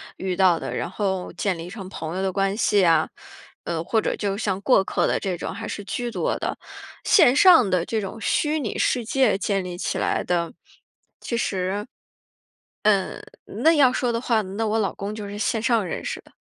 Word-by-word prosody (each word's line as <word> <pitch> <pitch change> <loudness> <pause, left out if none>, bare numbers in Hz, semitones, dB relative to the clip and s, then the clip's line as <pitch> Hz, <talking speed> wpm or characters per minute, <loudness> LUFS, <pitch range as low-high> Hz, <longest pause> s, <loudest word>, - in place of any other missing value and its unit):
遇 190 -1 -3
到 180 -2 +4
的， - - -5
然 - - -3
后 190 -1 -2
建 190 -4 -1
立 165 +2 -7
成 195 -1 -8
朋 165 -3 -6
友 190 - -2
的 190 - 0
关 195 +1 0
系 205 -3 +3
啊， 165 -2 +3 0.6
呃 165 -1 -2
或 220 +6 +1
者 - - -1
就 200 -1 -2
像 200 -3 -2
过 250 -2 +4
客 190 - 0
的 - - +1
这 185 -3 -3
种， - - -5
还 225 - -6
是 205 - -5
居 240 +4 -3
多 230 - -1
的。 - - -3 0.5
线 260 - +5
上 325 - +7
的 180 -2 +1
这 225 - -1
种 200 +1 -6
虚 300 +8 +1
拟 225 - -3
世 245 - +1
界 260 -1 +2
建 195 0 0
立 180 -1 -6
起 - - -2
来 - - 0
的， 170 -2 -1 0.7
其 235 - -4
实， 195 -3 -1 1.6
嗯 220 +5 -7
那 325 - +7
要 280 -5 +5
说 245 -1 0
的 230 - -1
话， 235 -3 +1
那 205 +3 -3
我 220 +1 +1
老 200 - 0
公 205 +2 -5
就 210 - -6
是 205 +1 -7
线 220 +1 0
上 230 -3 +2
认 175 - -4
识 - - -4
的。 - - -20
200 Hz, 225 characters per minute, -23 LUFS, 185-230 Hz, 1.6 s, 上